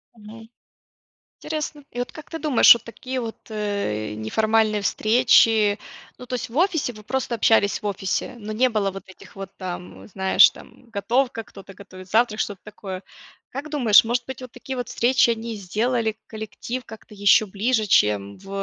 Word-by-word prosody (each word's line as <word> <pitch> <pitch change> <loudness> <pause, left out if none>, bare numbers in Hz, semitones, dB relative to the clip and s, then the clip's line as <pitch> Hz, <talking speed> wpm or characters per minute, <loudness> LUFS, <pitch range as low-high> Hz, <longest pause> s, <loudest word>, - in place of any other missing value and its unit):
Мгм. 225 +1 -13 0.9
Интересно. 300 -2 -5
И 245 - -8
вот 245 - -3
как 310 - -12
ты 325 - -6
думаешь, 290 -6 +7
вот 235 - -7
такие 255 +3 -6
вот, 225 -1 -5
э, 200 - -3
неформальные 215 - +1
встречи, 220 -2 +4 0.4
ну 250 - -10
то 250 - -4
есть 235 - -4
в 240 - -10
офисе. 330 -8 +1
Вы 215 -1 -14
просто 245 -1 -2
общались 205 -2 +3
в 210 - -6
офисе, 200 +5 -2
но 215 -1 -8
не 255 +4 +3
было 210 -4 0
вот 195 +1 -9
этих 190 - -16
вот 195 0 -9
там, 180 -1 -7
знаешь, 190 -1 +5
там, 240 -2 -17
готовка, 230 +3 -1
кто-то 195 -2 -13
готовит 185 -1 -13
завтрак, 220 -1 +2
что-то 200 -3 -3
такое. 195 -3 -8 0.5
Как 285 +3 -6
думаешь, 235 -8 +5
может 240 +1 -1
быть, 265 -1 -7
вот 255 - -9
такие 260 +2 -7
вот 245 -2 -4
встречи- 240 0 +3
они 230 0 -3
сделали 220 +3 -1
коллектив 225 +3 -6
как-то 220 -1 -13
еще 205 +1 +4
ближе, 215 +3 0
чем 105 - +2
в, 195 0 -15
220 Hz, 175 wpm, -23 LUFS, 200-245 Hz, 0.9 s, думаешь